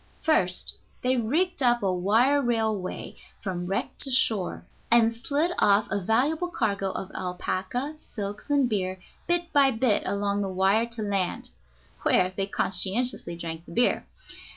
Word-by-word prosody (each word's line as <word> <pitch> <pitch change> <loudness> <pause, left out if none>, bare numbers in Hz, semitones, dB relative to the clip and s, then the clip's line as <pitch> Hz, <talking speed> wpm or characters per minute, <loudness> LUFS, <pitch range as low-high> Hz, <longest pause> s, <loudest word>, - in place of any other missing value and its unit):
First 185 - +2 0.3
they 255 +1 +2
rigged 290 +9 0
up 240 -3 +3
a 190 -2 +2
wire 225 +10 +3
railway 220 -6 -2 0.3
from 180 -3 -3
wreck 195 - -2
to 275 - +3
shore, 220 -7 +1 0.2
and 230 -1 +4
slid 290 +8 0
off 205 +1 +4
a 200 +1 0
valuable 280 - +1
cargo 200 - -1
of 190 0 -5
alpaca, 190 +10 -3
silks, 205 0 -7
and 285 -3 +3
beer 190 -4 -2 0.3
bit 345 0 0
by 280 -2 +6
bit 225 -3 +2
along 200 +1 0
the 195 - -2
wire 195 +5 +2
to 230 -2 -6
land 195 -3 -2 0.5
(where 185 0 +2
they 195 0 -1
conscientiously 195 +1 -1
drank 165 0 -6
the - - -10
beer). 240 +1 +1
215 Hz, 150 wpm, -26 LUFS, 190-255 Hz, 0.5 s, by